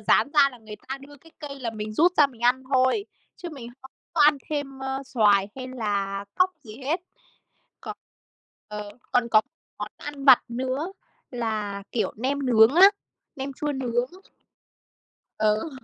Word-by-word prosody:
rán - - +3
ra 285 -2 +6
là 250 - -14
người 215 -2 -10
ta 270 +1 -4
đưa 285 +1 -14
cái 325 +4 -20
cây 280 -2 -8
là 235 -3 -2
mình 215 -1 -6
rút 340 +9 +4
ra 295 - +7
mình 250 -5 -17
ăn 250 +2 +3
thôi, 260 +10 +3 0.3
chứ 355 - -7
mình 250 -5 -8
không 265 - -13 0.2
có 325 - 0
ăn 295 -1 +6
thêm, 285 -3 -3
ơ, 265 0 -3
xoài 205 -6 +3
hay 255 -1 -6
là 200 -5 -2
cóc 370 0 +3
gì 215 -3 -11
hết. 295 +7 -1 0.8
Còn - - -7 0.7
ờ, 210 -1 -6 0.2
còn 240 -1 +2
có 215 - +7
một - - -29 0.3
món - - -4
ăn 290 -2 -7
vặt 265 -3 +8
nữa 260 +9 -3 0.4
là, 215 -5 -3
kiểu, 235 - 0
nem 270 +4 -1
nướng 230 +1 +6
á, 380 +4 +9 0.5
nem 275 0 -4
chua 295 +2 -3
nướng. 250 -2 -1 1.3
Ừ. 215 +8 +1
260 Hz, 175 wpm, -25 LUFS, 220-285 Hz, 1.3 s, á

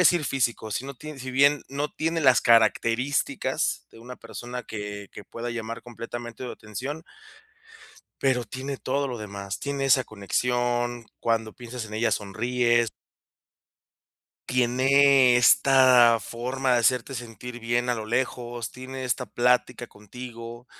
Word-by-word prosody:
decir 175 -4 +4
físico, 120 -5 -1
si 130 - -2
no 140 0 -7
ti 155 +3 -9
si 130 0 -5
bien 140 +2 +4
no 140 +2 -2
tiene 165 +1 -1
las 130 -4 +5
características 115 +4 +1
de 115 - -14
una 125 +2 -9
persona 120 +2 -7
que 105 -2 -6
que - - -9
pueda 120 +1 -6
llamar 115 -1 -5
completamente 120 0 -8
tu 125 - -5
atención 135 +9 -6 1.2
pero 130 -3 +1
tiene 135 +4 -5
todo 140 +2 -1
lo 120 -2 -5
demás. 100 -2 -6
Tiene 140 -1 -3
esa 130 -1 +4
conexión, 120 +3 -1 0.2
cuando 115 -1 0
piensas 120 -1 -7
en 105 - -9
ella, 115 +2 +1
sonríes 120 +2 +1 1.6
Tiene 130 +1 +5
esta 125 -1 +6
forma 125 +4 -2
de 120 - +4
hacerte 125 +2 +1
sentir 120 0 -8
bien 120 +2 0
a 125 - +2
lo 110 - -5
lejos, 120 -1 -2
tiene 130 +1 -7
esta 125 0 -1
plática 120 +2 +1
contigo, 115 +2 -10
120 Hz, 140 wpm, -26 LUFS, 115-130 Hz, 1.6 s, esta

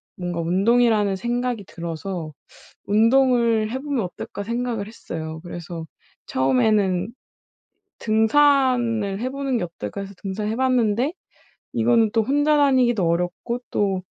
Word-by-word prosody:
뭔가 175 -1 -4
운동이라는 205 +3 +2
생각이 240 0 -2
들어서 170 -1 -5 0.6
'운동을 230 0 +3
해보면 265 -3 -2
어떨까?' 180 +3 -7
생각을 235 -1 -3
했어요. 160 -7 -7
그래서 170 -1 -7 0.4
처음에는 180 - +1 0.9
'등산을 230 -3 +2
해 250 +3 -2
보는 275 -1 -2
게 190 - -1
어떨까?' 165 - -7
해서 200 0 -8
등산해 210 +3 -3
봤는데 250 +1 +1 0.6
이거는 230 -2 +3
또 225 - +3
혼자 290 +5 +2
다니기도 255 -8 +3
어렵고 180 +8 -1
또 195 -2 0
220 Hz, 285 characters per minute, -22 LUFS, 185-245 Hz, 0.9 s, 운동을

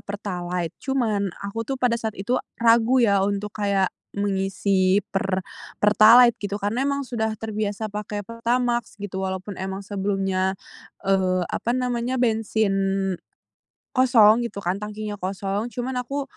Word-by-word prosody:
Pertalite, 180 -4 -4
cuman 220 -7 0 0.2
aku 200 +3 -4
tuh 270 - -1
pada 250 -2 +1
saat 220 -1 -4
itu, 240 +7 0 0.2
ragu 235 +2 +4
ya, 200 -2 +3
untuk 200 +1 -1
kayak 200 -3 0 0.2
mengisi 195 -1 +1
Per 190 -1 0 0.4
Pertalite 225 +4 +7
gitu 205 -1 -3
karena 215 +7 -1
emang 280 0 0
sudah 220 -3 -2
terbiasa 215 -1 -3
pakai 210 0 -4
Pertamax 235 +1 -1
gitu, 200 -2 -5
walaupun 190 +1 -4
emang 190 +1 -4
sebelumnya, 195 -1 -1 0.5
eee, 185 -2 +2
apa 240 +2 -1
namanya, 250 0 -1
bensin 220 -3 +1 1.2
kosong 240 -3 +6
gitu 200 - -7
kan, 180 +3 -1
tangkinya 210 0 -5
kosong 195 +3 -2
cuman 250 +2 -3
aku 275 +3 -3
210 Hz, 130 wpm, -24 LUFS, 195-235 Hz, 1.2 s, Pertalite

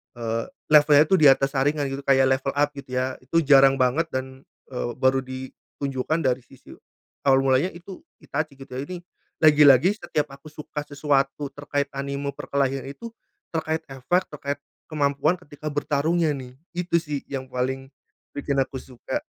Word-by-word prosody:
eee, 115 -1 -3 0.2
levelnya 150 0 +7
tuh 185 +2 +2
di 150 - +7
atas 135 0 +4
Sharingan, 140 0 0
gitu. 135 - -4
Kayak 135 -1 +4
level 135 0 -3
up, 145 0 +2
gitu 135 -3 -8
ya. 130 +1 -1
Itu 160 +6 0
jarang 135 -1 +6
banget, 135 +6 +1
dan, 130 -1 -6 0.2
eee, 120 -1 -3
baru 130 0 +3
ditunjukkan 130 +3 -4
dari 125 - -2
sisi 135 - -16 0.6
awal 135 0 +5
mulanya 135 +5 +3
itu 180 +2 -10 0.2
Itachi, 150 0 -3
gitu 135 0 -13
ya. 130 +3 -5
Ini, 180 -1 -7 0.4
lagi-lagi 150 - +6
setiap 150 -7 -2
aku 140 +3 -13
suka 150 -1 -7
sesuatu 140 -1 0
terkait 145 0 -3
anime 140 +1 -3
perkelahian 135 -1 -2
itu, 230 +12 -8 0.4
terkait 160 0 -2
efek, 135 +8 -1
terkait 140 -1 -5 0.2
kemampuan 150 +2 +1
ketika 155 -4 -10
bertarungnya 150 +2 +1
nih, 130 -3 -7 0.2
itu 175 0 -2
sih 150 -2 -3
yang 130 -1 -6
paling 130 +1 -3 0.4
bikin 145 0 -3
aku 130 0 -8
suka. 130 - -5
140 Hz, 160 wpm, -24 LUFS, 135-150 Hz, 0.6 s, levelnya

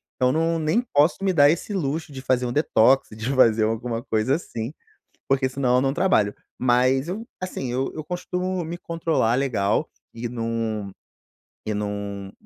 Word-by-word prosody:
então, 125 0 +2
não 165 +1 +1
nem 155 +10 +2
posso 150 -8 +2
me 195 -1 +2
dar 145 -4 +6
esse 175 +5 -3
luxo 155 -3 -2
de 130 -1 -7
fazer 125 -1 +1
um 120 - -3
detox, 135 -3 +3
de 110 +5 -3
fazer 115 -4 +5
alguma 115 +1 -2
coisa 110 +5 +1
assim, 120 -5 -5 0.6
porque 135 -1 +2
senão 130 -2 +1
eu - - +4
não 135 0 +1
trabalho, 160 - +2 0.2
mas 130 +3 +3
eu, 215 +5 -4 0.2
assim, 135 -9 -4
eu 135 +5 -2
costumo 180 +1 -3
me 170 +2 -5
controlar 165 -9 0
legal 115 -7 0 0.3
e 115 +1 -4
não 115 -3 -3 0.8
e 105 - -1
não 100 -1 -4
130 Hz, 165 wpm, -24 LUFS, 115-160 Hz, 0.8 s, dar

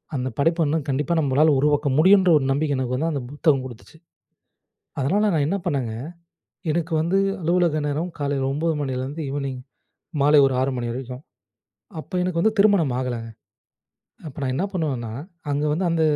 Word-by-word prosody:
அந்த 130 -1 -2
படைப்பு 165 +4 +2
வந்து 155 +2 +1
கண்டிப்பா 140 +4 0
நம்மளால 145 +2 +3
உருவாக்க 145 0 +2
முடியுன்ற, 190 +3 +6
ஒரு 135 - -1
நம்பிக்க 145 0 0
எனக்கு 125 -1 -1
வந்து, 160 +5 0
அந்த 140 - -2
புத்தகம் 145 -3 +1
குடுத்துச்சு. 130 +5 -12 1.0
அதனால 200 +10 +2
நான் 145 -2 +2
என்ன 195 - 0
பண்ணேங்க, 130 -9 -1 0.8
எனக்கு 165 +1 -2
வந்து 170 +4 +1 0.2
அலுவலக 170 -2 +1
நேரம் 160 +5 -2
காலையில 140 -2 -1
9:00 160 +3 0
மணிலேருந்து 135 +2 -3
ஈவினிங் 135 -2 -4 0.6
மாலை 145 +2 +5
6:00 135 - +2
ஒரு 135 - -1
மணி 120 -1 -3
வரைக்கும். 125 +2 -6 0.8
அப்ப - - -16
எனக்கு 180 -2 -1
வந்து 215 +4 +2
திருமணம் 195 -11 +4
ஆகலங்க. 120 -3 -3 1.0
அப்ப 145 - -9
நான் 130 -1 -1
என்ன 185 - 0
பண்ணுவேன்னா, 135 -10 -2 0.4
அங்க 145 +1 0
வந்து 180 +5 -1
அந்த, 165 -1 +1
145 Hz, 160 wpm, -23 LUFS, 130-165 Hz, 1.0 s, முடியுன்ற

